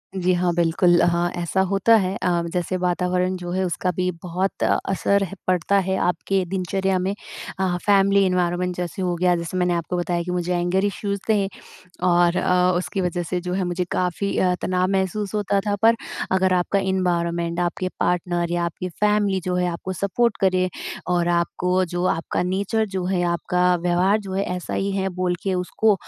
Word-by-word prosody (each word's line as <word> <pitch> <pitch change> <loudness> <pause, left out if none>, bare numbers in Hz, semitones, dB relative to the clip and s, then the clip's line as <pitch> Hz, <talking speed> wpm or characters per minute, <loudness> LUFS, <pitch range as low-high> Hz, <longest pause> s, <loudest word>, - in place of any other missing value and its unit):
जी, 185 -1 +1
हाँ। 175 0 +1
बिल्कुल, 175 +1 +3
हाँ, 175 0 +2
ऐसा 175 +2 0
होता 200 +4 +4
है 190 -3 +1
अ, 175 -1 +2
जैसे 180 +1 -1
वातावरण 180 +1 0
जो 175 -1 -6
है 190 +1 0
उसका 180 +1 -1
भी 185 0 0
बहुत 180 +2 -2
असर 200 +1 +1
है 190 - -5
पड़ता 185 +2 +2
है, 190 0 -1
आपके 185 +2 0
दिनचर्या 190 0 0
में। 190 +2 -1 0.5
हाँ 185 -2 +1
फैमिली 200 -1 +4
एनवायरनमेंट 180 0 0
जैसे 180 +1 -4
हो 180 -1 0
गया 180 0 +2
जैसे 170 +2 -4
मैंने 180 -1 +2
आपको 170 +1 -2
बताया 175 -1 -1
कि 180 - -4
मुझे 180 0 -1
एंगर 185 +3 +1
इश्यूज़ 200 0 -2
थे 205 -3 +3 0.6
और 175 0 +4
अ, 180 0 +3
उसकी 185 +2 -2
वज़ह 175 -1 -1
से 180 +2 -3
जो 180 0 -4
है 190 0 0
मुझे 180 0 -1
काफ़ी 185 +2 -1
अ, 180 -1 +3
तनाव 185 0 +1
महसूस 195 +2 -1
होता 200 -1 +1
था, 205 -1 +1
पर 230 +1 +6 0.4
अगर 190 0 +3
आपका 180 +2 +1
एनवायरनमेंट 175 -3 0
आपके 175 +1 -1
पार्टनर 175 -1 0
या 175 0 0
आपकी 170 +2 -4
फैमिली 205 +1 +1
जो 180 - -1
है 180 0 +1
आपको 185 +2 -5
सपोर्ट 200 +5 0
करें, 185 -1 +2 0.4
और 175 -1 +1
आपको 180 +2 +1
जो 175 +1 0
आपका 165 - -2
नेचर 200 +5 0
जो 185 - -1
है 180 -1 0
आपका 180 +1 +1
व्यवहार 180 +4 +2
जो 195 -2 -7
है 195 - 0
ऐसा 180 - -5
ही 195 - -1
है 190 0 0
बोलके 180 +1 -2
उसको 195 +4 +2
180 Hz, 185 wpm, -22 LUFS, 175-190 Hz, 0.6 s, पर